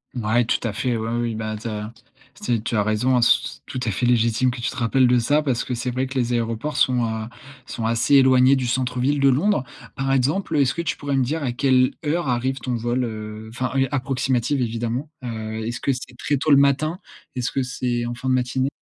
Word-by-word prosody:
Ouais, 120 0 +2
tout - - +1
à 110 - -3
fait. 120 +3 -1
Ouais, 110 0 -3
oui. 120 - -1
Oui, 115 - -4
ben 110 0 -3
tu 110 +2 -7
as 105 0 -5 0.5
t 120 -3 0
tu 115 - -2
as 105 - +3
raison, 120 +4 +2
c 115 - +4 0.2
c - - -10
tout 130 - -5
à 110 - 0
fait 95 +6 -1
légitime 120 +1 +2
que 120 0 -5
tu 120 - -1
te - - -10
rappelles 125 +1 +3
de 125 0 +4
ça, 145 +6 +2
parce 130 -5 0
que 125 - -3
c'est 125 +1 -3
vrai 130 +2 -1
que 135 +1 -5
les 120 -1 0
aéroports 115 +5 -2
sont, 125 -4 +3
heu, 110 -1 -3 0.4
sont 115 - -4
assez 115 +5 +2
éloignés 130 0 +6
du 130 -2 -1
centre-ville 125 +3 0
de 140 0 +5
Londres. 145 +2 +2 0.3
Par 135 0 -1
exemple, 145 +7 +1
heu, 145 - +4
est-ce 130 -3 +2
que 170 - -3
tu 170 - -2
pourrais 145 -1 -2
me 130 - +3
dire 150 +5 -2
à 125 - 0
quelle 130 0 +3
heure 165 +2 0
arrive 130 +2 0
ton 125 +1 -3
vol? 120 +2 -1
Heu, 110 -1 -6
enfin 125 +3 -3
et 135 0 +3
approximative 130 -1 0
évidemment. 120 +4 -2
Heu, 110 -2 -4
est-ce 120 +1 -4
que 140 - +1
c'est 125 -1 -8
très 145 - 0
tôt 150 - -2
le 140 - +8
matin? 140 +4 +2 0.4
Est-ce 125 -1 -2
que 135 - 0
c'est 125 -1 -2
en 120 - -4
fin 130 +2 -4
de - - +3
matinée? 130 +1 0
125 Hz, 245 wpm, -22 LUFS, 115-135 Hz, 0.5 s, le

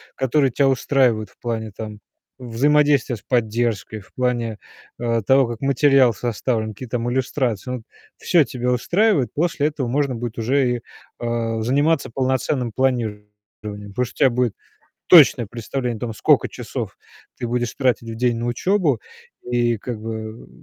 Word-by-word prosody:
которые 135 0 +2
тя 140 +3 +2
устраивают 125 -5 +2
в - - -27
плане, 110 -2 -3
там, 105 0 -8 0.4
взаимодействия 140 +2 +2
с 105 - -12
поддержкой, 110 -3 -1
в - - -21
плане, 120 -3 -1 0.4
э, 115 -1 0
того, 135 +1 +4
как 115 -1 -6
материал 135 -2 +4
составлен, 110 0 -2
какие 125 +4 -9
там 120 0 -2
иллюстрации- 125 -2 -1
ну, 125 -3 -5 0.3
всё 170 -4 +3
тебя 125 -1 -2
устраивает. 170 - +2
После 155 -2 +1
этого 145 -5 -3
можно 135 0 0
будет 120 0 -5
уже 125 +1 +1
и, - - -11 0.4
э, 115 -1 -2
заниматься 140 +6 +1
полноценным 130 -1 0
планированием, 120 -5 0 0.7
потому 125 +3 0
что 120 - -11
у - - +8
тя - - +3
будет 125 -2 0 0.5
точное 140 - +7
представление 120 +2 -4
о - - -18
том, 115 -2 -3
скока - - +3
часов - - -6 0.4
ты 120 - -3
будешь 120 0 -2
тратить 125 -3 0
в 115 - -5
день 120 0 +1
на 120 - -3
учёбу. 150 - +1 0.4
И, 120 -1 +1
как 115 +1 -6
бы, 110 0 -7
120 Hz, 155 wpm, -21 LUFS, 115-135 Hz, 0.7 s, у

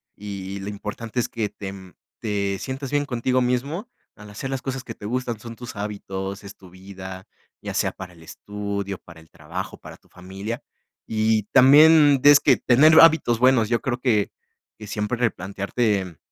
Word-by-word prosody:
y 100 -1 -7
lo 100 +1 -6
importante 105 +3 -5
es 120 - -1
que 110 -3 -3
te, 95 -1 -7
mm, 95 -2 -13 0.3
te 100 -2 -2
sientas 135 0 -5
bien 145 0 +1
contigo 125 0 0
mismo 140 - -2 0.3
al 105 0 -13
hacer 105 +6 -6
las 135 -1 -3
cosas 135 0 -4
que 115 - -8
te 105 - -11
gustan, 120 -1 -3
son 115 +1 -9
tus 120 -1 -9
hábitos, 100 -1 -5
es 100 - -10
tu 95 - -16
vida, 95 0 -10 0.3
ya - - -6
sea - - 0
para 90 -1 -10
el 85 -1 -17
estudio, 100 +2 -5
para 85 -2 -15
el 80 0 -19
trabajo, - - -7
para - - -12
tu - - -30
familia. 95 +5 -7 0.4
Y 110 -1 +1
también 145 +1 +7
des 145 +1 +8
que 130 - +4
tener 155 +6 +5
hábitos 155 -8 +5
buenos. 125 -3 +4
Yo 120 -2 +1
creo 125 -2 -2
que 110 -6 +1 0.5
que 105 -1 -10
siempre 105 +3 -2
replantearte 100 -3 -1
110 Hz, 180 wpm, -23 LUFS, 100-125 Hz, 0.5 s, des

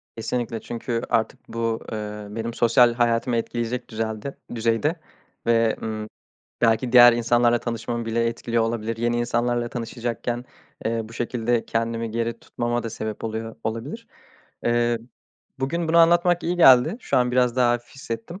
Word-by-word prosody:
Kesinlikle, 115 0 -3
çünkü 115 0 -3
artık 110 - 0
bu, 115 -1 -1
eee, 105 -1 -5
benim 115 +2 -4
sosyal 120 +1 +4
hayatımı 120 +1 +1
etkileyecek 120 +1 -3
düzelde 110 +3 -4 0.2
düzeyde 115 +7 +1 0.5
ve, 115 -1 +3
ııı, 110 -1 -4 0.5
belki 115 +1 +2
diğer 120 -1 +9
insanlarla 120 0 +3
tanışmamı 115 0 -3
bile 115 +1 +1
etkiliyor 115 0 -1
olabilir. 115 0 -2
Yeni 120 +1 0
insanlarla 120 0 0
tanışacakken, 120 0 -4 0.4
eee, 115 +1 0
bu 110 - -12
şekilde 120 0 -1
kendimi 115 0 -2
geri 115 +1 -2
tutmama 120 +1 -2
da 115 - -4
sebep 110 -1 -5
oluyor 110 0 -4
olabilir. 125 - -4 0.6
Eee, 120 0 +2 0.6
bugün 165 +5 -1
bunu 165 +1 +4
anlatmak 175 +1 +4
iyi 175 +2 -1
geldi. 135 - +6
Şu - - -1
an 125 -1 +3
biraz 125 -1 +2
daha 125 -1 +4
hafif 120 0 -5
hissettim. 135 - -6
120 Hz, 145 wpm, -24 LUFS, 115-120 Hz, 0.6 s, diğer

